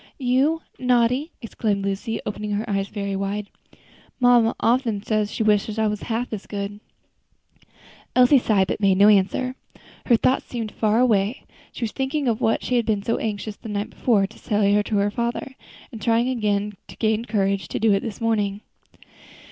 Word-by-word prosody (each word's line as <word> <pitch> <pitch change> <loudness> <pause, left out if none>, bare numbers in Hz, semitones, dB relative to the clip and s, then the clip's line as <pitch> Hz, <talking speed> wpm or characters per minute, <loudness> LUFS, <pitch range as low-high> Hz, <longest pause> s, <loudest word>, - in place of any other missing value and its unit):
"You 275 +5 +1 0.2
naughty!" 250 +4 +2
exclaimed 210 -3 -2
Lucy, 200 +3 -2
opening 210 0 -4
her 210 +3 -2
eyes 195 -2 -1
very 200 -2 -4
wide. 200 +1 -3 0.7
"Mamma 245 -2 +4
often 230 -4 +1
says 215 -2 0
she - - -1
wishes 210 0 +1
I 220 - +2
was 210 -1 -1
half 235 +1 -3
as 205 - -6
good." 200 0 -5 1.4
Elsie 255 +2 +6
sighed, 205 -5 +2
but - - -2
made 195 -2 +3
no 205 +2 +7
answer. 210 +6 +2 0.5
Her 240 - +6
thoughts 255 +3 +1
seemed 230 -3 -4
far 215 0 +1
away. 220 -2 +2 0.3
She - - -7
was 220 - -1
thinking 270 +1 -2
of 230 0 0
what 225 - +1
she 250 - 0
had 235 - +1
been 210 -3 0
so 230 - 0
anxious, 210 -1 -4
the 225 - -9
night 205 0 -3
before, 210 -6 +2
to 215 +3 -12
say 205 -1 +2
to 210 - -3
her 200 +1 +1
father, 235 +4 -3 0.4
and 225 -4 -9
trying 235 +2 +1
to 205 -1 -2
gain 220 +1 0
courage 195 -5 0
to - - -4
do 220 -2 +3
it 195 - +3
this 220 -2 -6
morning. 210 -3 0
215 Hz, 180 wpm, -23 LUFS, 205-235 Hz, 1.4 s, no